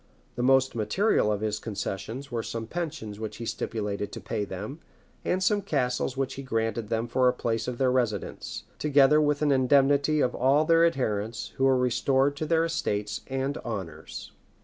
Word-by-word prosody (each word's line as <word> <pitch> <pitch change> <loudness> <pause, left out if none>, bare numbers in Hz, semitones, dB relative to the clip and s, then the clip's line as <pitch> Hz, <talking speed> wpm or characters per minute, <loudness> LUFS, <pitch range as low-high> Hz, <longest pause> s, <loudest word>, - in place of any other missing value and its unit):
The 120 - -2
most 130 +1 +4
material 110 - +2
of 105 -1 -1
his 105 -1 -1
concessions 115 +5 -5
were 115 -1 -1
some 115 0 -5
pensions 145 -8 -5
which 110 -1 -5
he 115 - -6
stipulated 105 -3 -3
to - - -5
pay 105 - -3
them, 105 - -6 0.4
and 185 +1 0
some 205 +1 +2
castles 130 -7 -1
which 135 -1 -1
he 135 - -6
granted 115 -3 -2
them 115 +1 -1
for 125 +2 +2
the 125 - +4
place 115 -2 -2
of 125 -1 -3
their 130 -1 +2
residence; 120 -6 -2 0.2
together 145 0 +5
with 150 0 +1
an 145 - +3
indemnity 140 +3 +4
for 125 - +3
all 140 +5 +3
their 165 +1 +5
adherents, 110 -7 -2
who 135 - +2
were 135 -1 +4
restored 130 +3 +2
to 155 - -3
their 165 0 +3
estates 105 -11 -2
and 135 +2 -2
honors. 90 -9 -6
125 Hz, 180 wpm, -27 LUFS, 110-145 Hz, 0.4 s, together